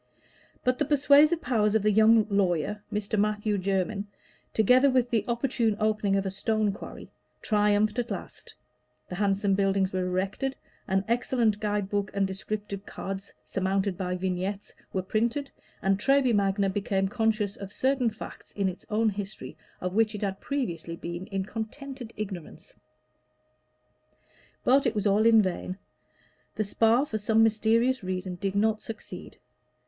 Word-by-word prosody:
But 255 0 +1
the 295 - +2
persuasive 295 +3 +5
powers 220 -4 +2
of 220 - +2
the 215 - +4
young 220 +1 +5
lawyer, 200 0 0
Mr. 210 0 -1
Matthew 210 0 0
Jermyn, 195 +2 -1 0.4
together 250 +6 +5
with 255 -2 +1
the 225 -3 +2
opportune 235 -3 0
opening 215 -2 +1
of 195 0 0
a 190 - -1
stone 215 +2 0
quarry, 195 - -9 0.3
triumphed 210 +1 +2
at 240 0 -2
last; - - -7 0.5
the - - -6
handsome 195 +1 +1
buildings 195 -1 +1
were 185 -1 0
erected, 190 +9 -2 0.3
an 190 +1 +1
excellent 235 -2 +1
guide 210 -2 -1
book 200 -1 -1
and 200 -1 +2
descriptive 200 +1 -5
cards, 195 0 -6
surmounted 195 0 0
by 180 -1 -2
vignettes, 190 +2 -3 0.2
were 185 - -1
printed, 235 +8 -1 0.3
and 195 0 +2
Treby 270 0 +3
Magna 200 -1 +2
became 195 0 0
conscious 215 -1 0
of 195 -1 -8
certain 260 0 +1
facts 215 - -10
in 200 -2 0
its 185 -1 -6
own 220 +1 +2
history 205 +1 -6 0.3
of 180 0 -2
which 220 +1 +2
it 210 - -5
had 195 -1 -3
previously 170 - -3
been 170 +2 -6
in 195 -1 -2
contented 240 +3 -6
ignorance. 190 -6 -7 1.9
But 270 +1 +4
it 235 - -1
was 210 - -1
all 210 +2 +4
in 225 -2 +6
vain. 185 0 -3 0.8
The 215 - 0
Spa, 225 +5 +3
for 220 -7 -3
some 220 +2 +3
mysterious 225 +3 +2
reason, 185 0 -3
did 195 +2 -3
not 215 +1 +2
succeed. 215 -5 -8
210 Hz, 155 wpm, -27 LUFS, 195-225 Hz, 1.9 s, in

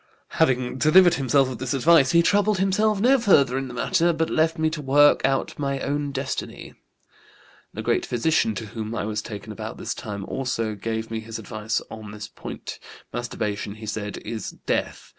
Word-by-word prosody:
Having 125 0 +2
delivered 175 +4 +6
himself 135 0 +2
of 130 - -6
this 130 0 -2
advice 145 0 +5
he 170 +2 +5
troubled 205 +2 +3
himself 200 +2 +2
no 260 +5 +4
further 140 - +4
in 135 0 -2
the 125 - -8
matter, 165 +8 +2
but 160 0 -1
left 160 +1 +2
me 160 0 +1
to 155 -1 -4
work 145 +1 +5
out 135 +1 0
my 140 -1 -1
own 145 +1 -2
destiny. 135 0 -5 1.0
The - - -4
great - - 0
physician, 120 -2 +1
to 110 - -5
whom 110 +1 -5
I 105 - -2
was 105 0 -2
taken 105 0 -8
about 105 - -7
this - - -3
time, 100 -2 -6
also 120 -4 -2
gave 110 +2 -4
me 110 - -2
his 110 0 -7
advice 110 0 -3
on 110 -1 -8
this 105 0 -7
point. - - -8 0.3
'Masturbation,' 105 -4 -3
he 110 0 -9
said, 105 -1 -4
'is 110 -3 -4 0.2
death. - - -2
130 Hz, 185 wpm, -24 LUFS, 110-155 Hz, 1.0 s, delivered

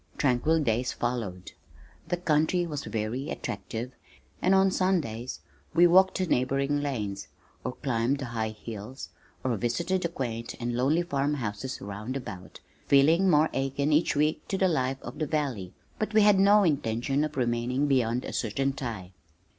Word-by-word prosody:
Tranquil 145 +4 +2
days 120 +1 0
followed. 110 -7 -3 0.6
The 175 - -1
country 170 +1 +2
was 150 -4 -5
very 115 +6 -3
attractive, 120 +2 -5 0.5
and 185 +2 +4
on 190 0 +4
Sundays 150 - -1 0.3
we 175 +1 +7
walked 190 +2 +5
the 185 - 0
neighboring 140 0 +1
lanes, 105 -9 -3 0.4
or 125 - -3
climbed 125 0 0
the 140 - -5
high 115 -2 -2
hills, 110 +3 -8 0.3
or 125 -2 0
visited 170 - 0
the 170 - -1
quaint 115 -7 -4
and 120 0 -2
lonely 145 +8 +2
farm 145 -3 0
houses 120 0 -4
round 105 +6 -5
about, 95 -8 -9 0.3
feeling 160 +7 +5
more 155 -1 +4
akin 140 +2 0
each 155 +1 +3
week 150 +1 0
to 195 - -1
the 190 - +3
life 135 -6 0
of 125 +5 -8
the 155 - -1
valley, 135 - -2 0.3
but 215 0 -2
we 215 - +7
had 205 -2 +5
no 205 +1 +6
intention 135 - 0
of 150 -2 -4
remaining 120 +2 0
beyond 125 -3 +1
a - - -6
certain 135 +5 -1
time. 115 -9 -6
135 Hz, 160 wpm, -28 LUFS, 120-155 Hz, 0.6 s, we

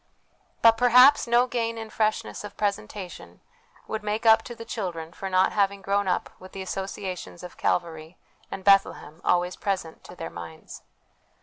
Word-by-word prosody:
But 225 0 +7
perhaps 250 +3 +6
no 240 +1 +4
gain 230 -2 -2
in 220 -1 -7
freshness 215 -1 -1
of 205 - -9
presentation 200 -2 -4 0.5
would 220 - -3
make 210 +2 -3
up 225 0 +7
to 240 - -7
the 230 - -9
children 175 -8 -5
for 195 - -6
not 185 0 +3
having 200 -1 0
grown 200 0 0
up 180 - -1
with 185 - -13
the 195 - -5
associations 190 -2 -6
of 180 - -9
Calvary 165 -1 -2 0.3
and 190 - -7
Bethlehem 195 -5 +2
always 180 0 +1
present 185 -5 -4
to - - -11
their - - -7
minds. 80 -2 -10
195 Hz, 165 wpm, -26 LUFS, 180-220 Hz, 0.5 s, But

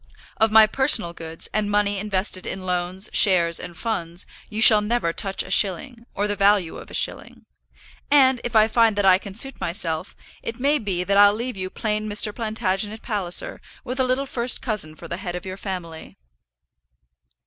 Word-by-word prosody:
Of 220 0 +2
my 220 0 +7
personal 225 -7 +3
goods, 165 -1 -5
and 210 -1 -1
money 205 -1 0
invested 190 -2 -2
in 185 -1 -6
loans, 180 +2 -1
shares, 170 -4 +4
and 175 -2 -9
funds, 175 -6 -4 0.2
you 215 - -5
shall 220 -1 +8
never 210 -5 -1
touch 195 +1 -3
a 185 - -11
shilling, 230 +6 0
or 205 +1 -1
the 205 - -2
value 200 -3 +1
of - - -12
a - - -6
shilling. - - -3 0.6
And, 265 -4 +4
if 240 - -5
I 215 0 +5
find 225 -1 +2
that 205 -1 0
I 185 -1 +6
can 195 -1 -10
suit 270 +4 0
myself, 170 -1 -4 0.3
it 230 +1 -6
may 285 +3 +1
be 190 -5 -3
that 200 +2 0
I'll 205 0 +6
leave 240 +2 -5
you 185 -1 -5
plain 215 +1 -3
Mr. 210 0 +1
Plantagenet 215 -1 -3
Palliser, 195 -6 -2 0.2
with 255 +1 -6
a - - +3
little 255 +2 0
first 245 -2 +2
cousin 205 -10 -4
for 170 - -11
the - - -5
head 180 -3 -6
of 180 - -7
your 185 0 -6
family. 180 -5 -8
205 Hz, 190 wpm, -22 LUFS, 185-225 Hz, 0.6 s, shall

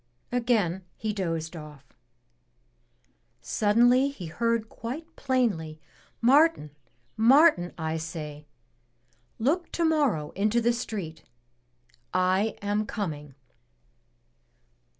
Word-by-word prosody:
Again 225 -7 +1
he 215 0 -3
dozed 165 -4 -3
off. 150 -3 -10 1.5
Suddenly 245 +6 +3
he 240 -11 -8
heard 230 +6 -1
quite 310 +10 -7
plainly, 210 - -1 0.4
"Martin, 275 - +4 0.4
Martin, 240 - +5
I 160 -1 -2
say! 150 -2 -7 0.9
Look 310 +10 0
tomorrow 295 - +1
into 215 +4 +1
the 235 +1 +2
street. 190 -9 -5 0.9
I 185 +4 +2
am 205 +1 0
coming." 150 - -5
210 Hz, 85 wpm, -27 LUFS, 160-245 Hz, 1.5 s, Martin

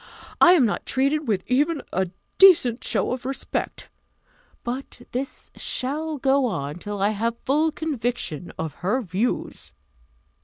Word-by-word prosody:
I 350 - +9
am 305 -9 +5
not 210 - -2
treated 280 +3 +1
with 200 -4 0
even 295 +5 +2
a 190 0 0 0.3
decent 315 -11 +6
show - - 0
of 250 0 -3
respect! 270 +2 -4 0.8
But 245 0 -5
this 265 +2 -5
shall 305 +4 -3
go 270 0 +3
on 145 -5 -4
till 205 +2 -5
I 200 +2 +3
have 230 +2 -1
full 305 +6 +1
conviction 245 - -3
of 160 -2 -3
her 245 +8 +1
views." 200 +6 -2
250 Hz, 140 wpm, -24 LUFS, 210-285 Hz, 0.8 s, I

